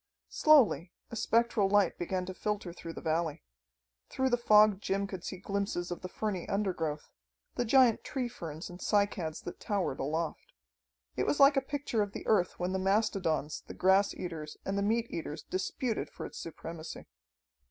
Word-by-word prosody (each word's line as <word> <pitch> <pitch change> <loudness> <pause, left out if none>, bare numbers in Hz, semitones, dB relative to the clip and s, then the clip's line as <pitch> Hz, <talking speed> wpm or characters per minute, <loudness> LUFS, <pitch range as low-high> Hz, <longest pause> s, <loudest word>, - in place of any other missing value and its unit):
Slowly 220 - +4 0.2
a - - -5
spectral 225 -3 +2
light 205 -3 +3
began 180 +1 -2
to 185 - -5
filter 205 -3 -3
through 165 -1 -8
the - - -8
valley. 160 - -1 0.7
Through 265 0 0
the - - +5
fog 210 -4 +5
Jim 200 0 0
could 190 -3 -7
see 190 - -5
glimpses 195 -2 -2
of 175 - -4
the 185 - -4
ferny 195 -3 -3
undergrowth, 170 -7 -2 0.4
the 245 - -1
giant 245 -1 +5
tree 260 -4 -2
ferns 165 -8 -7
and 180 0 -10
cycads 200 -6 0
that 175 - -7
towered 195 -9 -1
aloft. 160 +4 -3 0.6
It - - 0
was 290 - +1
like 280 +1 +7
a 270 - +3
picture 275 -4 -2
of 205 -1 -2
the - - -7
earth 185 -5 +2
when 180 +1 -1
the 190 - 0
mastodons, 190 -6 0
the - - -8
grass 190 +2 +3
eaters 160 -4 -6
and 195 - -1
the 200 - +1
meat 225 +3 +1
eaters 155 -2 -5
disputed 215 +5 -2
for - - -8
its - - -8
supremacy. 165 0 -7
195 Hz, 175 wpm, -31 LUFS, 170-215 Hz, 0.7 s, like